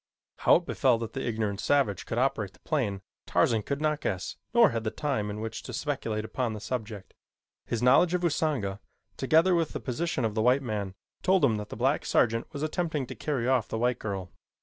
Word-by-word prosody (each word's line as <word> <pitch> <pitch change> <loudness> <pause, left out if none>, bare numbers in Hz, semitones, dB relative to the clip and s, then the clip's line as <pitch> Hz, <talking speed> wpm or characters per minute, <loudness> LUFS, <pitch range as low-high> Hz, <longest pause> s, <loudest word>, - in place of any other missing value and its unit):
How - - +6
it 175 - +1
befell 130 -8 +2
that 115 -1 -5
the 135 - -3
ignorant 110 -3 -1
savage 110 -4 +1
could 115 - -3
operate 110 -6 0
the - - -22
plane, 105 -10 -1 0.2
Tarzan 115 -2 +2
could 140 +6 -3
not 150 -1 0
guess 95 -2 -3 0.2
nor 235 -3 +6
had 115 -1 -2
he 110 - 0
time 120 -6 -2
in 105 +1 -5
which 115 0 -4
to - - -8
speculate 115 -7 -2
upon 120 0 -2
the 105 - -6
subject. 105 -3 -5 0.5
His 120 0 -2
knowledge 170 +8 +5
of 180 - -1
Usanga, 145 - 0 0.4
together 160 +7 +4
with 165 -3 +1
the - - -3
position 130 -1 -2
of 110 - -1
the 110 - 0
white 125 +4 +3
man, 105 -5 -3 0.3
told 185 -4 +4
him 110 -5 +2
that 105 0 -6
the - - -6
black 135 +5 +1
sergeant 115 0 +2
was 145 -1 -5
attempting 155 -3 -1
to - - -8
carry 135 -6 -2
off 130 -4 +2
the - - -3
white 120 +1 +1
girl. 95 -4 -4
120 Hz, 215 wpm, -28 LUFS, 110-145 Hz, 0.5 s, How